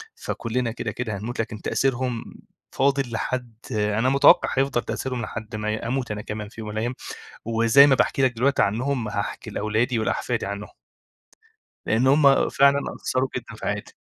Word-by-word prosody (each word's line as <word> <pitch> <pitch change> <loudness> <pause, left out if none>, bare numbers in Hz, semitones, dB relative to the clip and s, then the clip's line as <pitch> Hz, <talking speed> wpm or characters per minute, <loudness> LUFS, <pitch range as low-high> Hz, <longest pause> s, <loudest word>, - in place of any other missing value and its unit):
فكلنا 115 0 -3
كده، 120 - -4
كده 115 -5 -4
هنموت 115 +5 -6
لكن 110 -1 -3
تأثيرهم 125 -3 -1 0.5
فاضل 135 -3 +1
لحد 120 0 -3 0.2
أنا 105 +3 +1
متوقع 140 0 +6
هيفضل 135 -3 +2
تأثيرهم 125 -2 -3
لحد 110 -1 -6
ما 105 0 -2
ي 110 - -1
أموت 120 0 -3
أنا 105 0 -4
كمان 105 -1 -6
في 115 - -10
يوم 105 - -6
من - - -6
الأيام. 120 +3 -1 0.5
وزي 115 +5 +6
ما 135 - +5
باحكي 135 - +1
لك 130 -1 +4
دلوقتي 135 +4 +2
عنهم 120 +3 0
هاحكي 105 -1 -4
لأولادي 110 +3 0
ولأحفادي 110 - -1
عنهم. 100 +1 -5 1.2
لأن 120 +4 +2
هُم 140 0 +5
فعلًا 140 +1 +4 0.2
أثّروا 130 +1 -1
جدًا - - -6
في - - -9
حياتي. - - -3
120 Hz, 165 wpm, -24 LUFS, 110-130 Hz, 1.2 s, متوقع